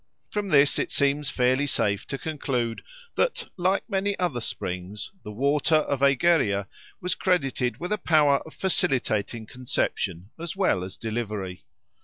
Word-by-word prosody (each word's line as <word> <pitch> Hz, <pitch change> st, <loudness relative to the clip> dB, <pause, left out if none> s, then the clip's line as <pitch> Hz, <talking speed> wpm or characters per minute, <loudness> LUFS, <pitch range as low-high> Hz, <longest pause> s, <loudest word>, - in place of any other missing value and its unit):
From 210 Hz, -1 st, -2 dB
this 145 Hz, -5 st, +4 dB
it -, -, -1 dB
seems 140 Hz, 0 st, +2 dB
fairly 130 Hz, +3 st, +2 dB
safe 100 Hz, -6 st, 0 dB
to 135 Hz, -, -3 dB
conclude 130 Hz, -7 st, -2 dB, 0.3 s
that, -, -, -1 dB
like 185 Hz, +2 st, +1 dB
many 200 Hz, -1 st, 0 dB
other 170 Hz, -10 st, -1 dB
springs, 95 Hz, 0 st, -4 dB
the -, -, -7 dB
water 140 Hz, +7 st, +2 dB
of 145 Hz, -3 st, +1 dB
Egeria 140 Hz, -, +3 dB, 0.3 s
was 180 Hz, -, 0 dB
credited 135 Hz, -9 st, 0 dB
with 175 Hz, +3 st, -4 dB
a 210 Hz, -, -1 dB
power 150 Hz, -5 st, +4 dB
of 160 Hz, -, -13 dB
facilitating 120 Hz, -, 0 dB
conception 105 Hz, -6 st, -2 dB
as 170 Hz, +2 st, -5 dB
well 185 Hz, -, +2 dB
as 95 Hz, 0 st, -7 dB
delivery. 105 Hz, -5 st, -4 dB
140 Hz, 145 wpm, -26 LUFS, 110-170 Hz, 0.3 s, this